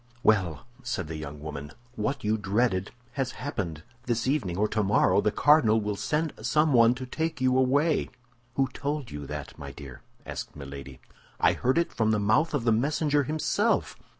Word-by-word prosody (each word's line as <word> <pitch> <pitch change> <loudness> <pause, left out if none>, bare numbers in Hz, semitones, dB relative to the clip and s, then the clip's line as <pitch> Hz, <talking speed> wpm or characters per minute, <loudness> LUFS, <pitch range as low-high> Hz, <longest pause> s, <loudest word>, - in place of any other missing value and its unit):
"Well," 95 -7 +2 0.2
said 120 -9 -3
the 80 - -5
young 75 -1 -7
woman, 75 -1 -7 0.2
"what 125 +6 -2
you 105 +1 +2
dreaded 105 -1 0 0.2
has 130 0 -2
happened. 85 - -4 0.2
This 120 -1 0
evening, 130 - 0
or 105 +2 +2
tomorrow, 105 -1 +3
the 105 - +1
cardinal 115 -3 +5
will 105 -1 -2
send 155 +8 -1
someone 125 -2 +4
to 130 +1 -6
take 160 +3 -3
you 130 0 +2
away." 140 +5 +2 0.5
"Who 135 -1 +2
told 145 -3 -3
you 75 -1 -6
that, 75 -1 -7
my - - -7
dear?" 70 -4 -10 0.2
asked - - -6
Milady. 70 -2 -9 0.4
"I - - +4
heard 130 +5 +1
it 170 - +1
from 110 -1 +1
the 110 -1 +2
mouth 110 +11 +2
of 135 - -1
the 115 - +3
messenger 145 +4 +2
himself." 155 +3 0
115 Hz, 175 wpm, -27 LUFS, 95-140 Hz, 0.5 s, cardinal